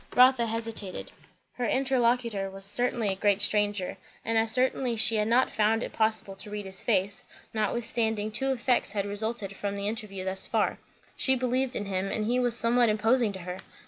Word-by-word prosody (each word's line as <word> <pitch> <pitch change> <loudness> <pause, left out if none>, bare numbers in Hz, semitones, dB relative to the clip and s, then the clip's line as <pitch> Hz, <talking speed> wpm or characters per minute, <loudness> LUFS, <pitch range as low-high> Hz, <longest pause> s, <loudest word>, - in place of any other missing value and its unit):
Rotha 250 -2 +5
hesitated. 225 -4 -4 0.4
Her 245 -1 -2
interlocutor 240 -6 +1
was 195 0 -7
certainly 235 +1 0
a 190 - -1
great 200 0 +2
stranger; 205 -2 0 0.3
and 225 - 0
as 225 0 +3
certainly 250 0 +1
she 225 0 +1
had 210 0 +1
not 245 +3 +3
found 220 +2 +1
it - - -6
possible 220 -3 0
to 200 - -8
read 205 -1 -5
his 190 0 -6
face; 200 -3 0 0.3
notwithstanding, 220 0 -1
two 270 +5 0
effects 250 -1 +1
had 200 -2 -1
resulted 205 -1 -2
from 200 0 -3
the 200 0 -3
interview 210 -4 -4
thus 190 0 +1
far; - - 0 0.4
she 265 - +3
believed 255 +1 0
in 205 - -2
him, 190 0 -2
and 215 - -1
he 245 +3 +1
was 245 -2 +4
somewhat 235 0 +4
imposing 225 +2 +2
to 190 - -7
her. 180 +1 -6
220 Hz, 185 wpm, -28 LUFS, 200-240 Hz, 0.4 s, Rotha